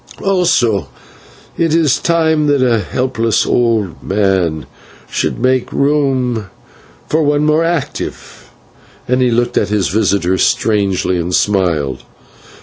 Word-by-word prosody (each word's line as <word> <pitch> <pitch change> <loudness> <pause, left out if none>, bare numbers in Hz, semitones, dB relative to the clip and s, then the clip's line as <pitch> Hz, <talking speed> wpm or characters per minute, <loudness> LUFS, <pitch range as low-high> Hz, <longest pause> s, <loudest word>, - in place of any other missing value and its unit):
Also 165 - +1 0.7
it 165 -1 +2
is 155 -5 +2
time 160 -2 +1
that 145 -2 +2
a 120 -3 +2
helpless 115 -1 -1
old 115 -7 0
man 95 -6 0 0.4
should - - -2
make 130 +1 0
room 130 -6 0 0.6
for 150 -2 +1
a - - +1
more 155 +2 +2
active 165 -4 -4 0.6
one." 125 +1 +1
And - - +1
he 125 - +3
looked 120 +1 +1
at 100 - -2
his 105 -4 0
visitor 95 -2 +1
strangely, 100 -4 +1
and 85 +2 -1
smiled. 85 -10 0
120 Hz, 125 wpm, -15 LUFS, 100-145 Hz, 0.7 s, he